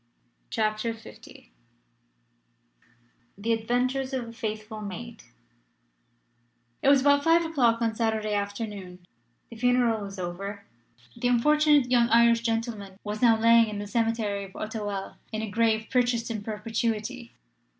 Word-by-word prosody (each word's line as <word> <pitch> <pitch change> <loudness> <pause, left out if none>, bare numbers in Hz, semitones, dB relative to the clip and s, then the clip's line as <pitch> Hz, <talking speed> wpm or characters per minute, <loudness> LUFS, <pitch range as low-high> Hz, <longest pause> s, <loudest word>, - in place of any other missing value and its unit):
CHAPTER 215 +1 -1
LV 220 - -15 1.9
THE 225 +3 0
ADVENTURES 255 +4 -1
OF 245 -3 -3
A - - -10
FAITHFUL 215 -1 -5
MAID 220 +4 -7 1.6
IT - - +4
was 280 -2 +6
about 285 +1 +4
five 330 +1 +4
o'clock 240 -8 +2
on 225 -1 +1
Saturday 220 -2 -1
afternoon. 200 -3 -5 0.5
The 230 - -9
funeral 245 -2 +2
was 195 0 -8
over. 195 +3 -5 0.5
The 245 - -1
unfortunate 295 +2 +4
young 240 -1 +4
Irish 235 0 +5
gentleman 225 -4 -3
was 210 +1 -5
now 230 -2 +5
lying 230 0 +6
in 210 - -5
the 205 - -4
cemetery 220 -2 -1
of 190 - -15
Auteuil 205 -3 -5
in 220 0 -3
a 215 - -5
grave 220 0 +2
purchased 245 -2 +1
in 215 -2 -4
perpetuity. 225 +3 -3
225 Hz, 130 wpm, -27 LUFS, 210-240 Hz, 1.9 s, was